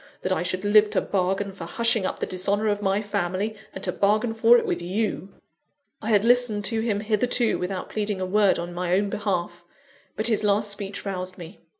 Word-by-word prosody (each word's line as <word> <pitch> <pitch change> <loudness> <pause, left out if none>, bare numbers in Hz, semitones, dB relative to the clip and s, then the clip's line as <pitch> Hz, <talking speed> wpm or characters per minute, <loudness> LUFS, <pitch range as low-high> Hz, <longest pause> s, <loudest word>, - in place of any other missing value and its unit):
that 185 - -1
I 185 - +1
should 185 +2 -3
live 210 +1 +5
to - - +1
bargain 195 +1 -1
for 185 - -8
hushing 225 +2 +1
up - - -4
the - - -2
dishonour 200 +3 -1
of 205 0 -1
my 195 +1 0
family, 200 +2 -2 0.2
and 190 - -9
to - - -1
bargain 215 +3 +1
for 230 +2 +6
it - - -1
with - - -2
you." 195 +2 -2 0.7
I 220 - -4
had 210 -1 +3
listened 240 -4 +3
to 225 +2 0
him 210 -3 -1
hitherto 225 +2 +1
without 185 +1 -4
pleading 210 -2 -2
a 185 - -1
word 200 +1 +3
in 175 +1 -5
my 180 0 0
own 200 +1 0
behalf; 175 -4 -3 0.5
but 215 - -2
his 220 -2 +3
last 205 0 +2
speech 200 0 -5
roused 185 -1 -4
me. 175 +2 -11
205 Hz, 210 wpm, -24 LUFS, 185-215 Hz, 0.7 s, for